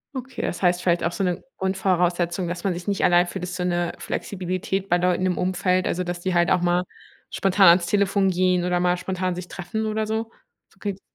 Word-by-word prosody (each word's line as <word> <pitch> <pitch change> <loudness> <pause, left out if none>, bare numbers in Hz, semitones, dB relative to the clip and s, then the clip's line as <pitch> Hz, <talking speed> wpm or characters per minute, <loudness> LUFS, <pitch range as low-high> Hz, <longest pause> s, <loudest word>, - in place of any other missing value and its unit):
Okay, 260 0 -6
das 175 - -3
heißt 180 -1 +2
vielleicht 175 -2 +1
auch 170 - -1
so 195 - -2
'ne 180 -2 -1 0.2
Grundvoraussetzung, 180 -2 0
dass 175 +1 -5
man 190 - +1
sich 175 +1 -7
nicht 200 -2 +1
allein 175 0 +4
fühlt, 185 0 -6
ist 180 - -6
so 180 - -2
'ne 175 -1 0
Flexibilität 190 +1 -3
bei 175 - +4
Leuten 180 +1 +1
im 185 -1 0
Umfeld, 185 0 +1
also 180 - -1
dass 175 0 -4
die 185 +1 -2
halt 175 -1 +3
auch 180 - +4
mal 175 0 +2 0.5
spontan 195 -1 +4
ans 175 +1 +5
Telefon 200 +1 +2
gehen 180 -1 +2
oder 180 0 +1
mal 180 0 +2
spontan 185 0 -2
sich 180 0 -7
treffen 195 +6 -4
oder 215 0 -1
so? 220 +1 -2 0.4
So - - -29
geht's 195 -2 -4
180 Hz, 220 wpm, -23 LUFS, 175-190 Hz, 0.5 s, ans